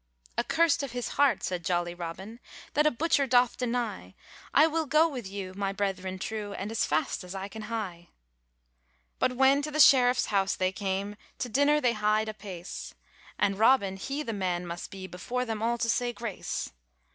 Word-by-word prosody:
'Accurst 330 -2 +2
of 275 -4 -5
his 245 -1 -3
heart,' 280 -7 +2
said 180 -2 -2
jolly 175 0 0
Robin, 180 +6 -7 0.3
'That 300 +1 +4
a - - +6
butcher 285 0 +1
doth 245 -1 +4
deny; 230 - -3 0.4
I 300 - +6
will 320 -1 0
go 310 +4 +5
with 250 -10 -6
you 195 -1 -6
my 195 0 -2
brethren 190 -2 -2
true, 205 +1 -4
And 200 +2 -5
as 225 - +1
fast 155 +4 -1
as 180 +1 -8
I 195 0 -4
can 220 +2 -9
hie.' 185 -7 -5 1.1
But 255 - +2
when 270 +2 +5
to 300 - -3
the 305 +1 -3
sheriffs 250 -3 +6
house 195 -1 +2
they 185 -1 0
came, 195 +1 -3 0.2
To 250 - -3
dinner 285 +5 +3
they 245 -5 +2
hied 215 0 +1
apace, 195 -4 -7 0.4
And 200 -1 +1
Robin 220 -4 +4
he 275 +10 -4
the 230 - -4
man 180 -3 -1
must 175 0 -6
be 190 -1 -8
Before 215 +8 -3
them 220 -2 -3
all 235 +1 +1
to 230 - -1
say 240 +1 +1
grace. 235 -5 -4
215 Hz, 185 wpm, -28 LUFS, 190-250 Hz, 1.1 s, a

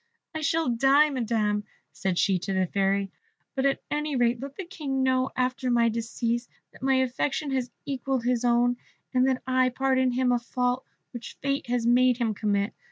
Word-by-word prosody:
"I 315 - -4
shall 320 +2 +1
die, 270 +5 +4
Madam," 220 -5 0 0.3
said 190 -3 -2
she 190 -1 +2
to 195 +2 -3
the 190 0 +2
Fairy, 195 +1 0 0.4
"but 270 0 +1
at 275 - -1
any 300 -1 -1
rate 240 -1 +2
let 275 0 -7
the 385 - -6
King 290 -8 -3
know, 260 0 +2
after 255 0 -1
my 235 -1 +3
decease, 235 +1 -2 0.2
that - - -17
my 265 0 +2
affection 260 +3 0
has 255 -2 -1 0.2
equalled 270 -2 -2
his 245 0 +1
own, 245 0 +3 0.4
and 255 +1 +3
that 260 -1 0
I 255 0 +3
pardon 260 0 +1
him 255 0 +2
a 245 - +2
fault 250 +1 -1 0.3
which 240 -2 -8
fate 275 -1 -1
has 240 -1 0
made 250 +1 +4
him 230 -3 0
commit. 205 -1 0
250 Hz, 185 wpm, -26 LUFS, 235-265 Hz, 0.4 s, die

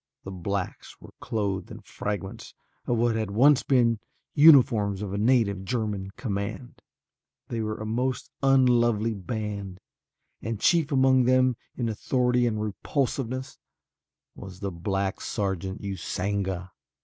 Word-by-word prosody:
The 95 - -7
blacks 95 +1 -4
were - - -14
clothed 110 -5 -2
in 110 -1 -9
fragments 100 -1 -6 0.3
of 120 - +1
what 115 0 +2
had 110 -2 -1
once 135 +7 +5
been 120 -4 +2 0.3
uniforms 120 -10 +5
of 100 -2 -4
a - - -2
native 110 -4 +2
German 105 -3 -2
command. 110 +2 -5 0.7
They 115 -1 -2
were 110 0 -3
a 110 - -6
most 125 +4 -2
unlovely 120 -5 +3
band 100 -2 -5 0.6
and 110 -1 -4
chief 165 0 +3
among 130 -2 +4
them 130 0 +3 0.2
in 120 - -1
authority 125 +2 +1
and 110 -2 -1
repulsiveness 130 +4 -3 0.7
was 95 -2 -10
the 100 -1 -3
black 95 +3 -2
sergeant 95 -1 -3
Usanga. 95 -1 -3
110 Hz, 125 wpm, -26 LUFS, 100-125 Hz, 0.7 s, once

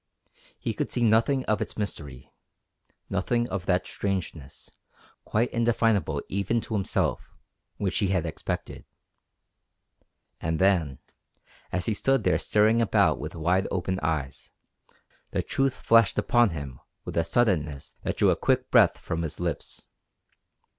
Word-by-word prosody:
He - - -3
could - - -3
see 120 - 0
nothing 115 +4 +3
of 110 -1 0
its - - -4
mystery, 75 - -5 0.8
nothing 120 0 0
of 95 -1 -4
that 90 0 +2
strangeness, 90 -8 -5 0.5
quite 115 +3 0
indefinable 115 -9 +1
even 100 +4 0
to 110 - -7
himself, 100 -3 -1 0.5
which 95 -2 -1
he 100 - +1
had 90 -3 0
expected. 80 - -5 1.6
And 80 0 -1
then, 85 -8 +2 0.7
as 90 0 -1
he 110 - 0
stood 135 +6 +1
there - - +2
staring 110 +2 +3
about 115 - +3
with - - -6
wide 85 +4 +1
open 95 +1 -2
eyes, 75 -4 -3 0.8
the - - -1
truth 135 -1 0
flashed 115 -2 +4
upon 120 -2 +3
him 70 -6 -7 0.3
with - - -6
a 85 - +2
suddenness 80 - 0
that - - -3
drew - - +4
a - - +2
quick - - 0
breath - - +5
from 80 0 -4
his 80 -1 -4
lips. 85 -1 -4
95 Hz, 140 wpm, -26 LUFS, 80-115 Hz, 1.6 s, breath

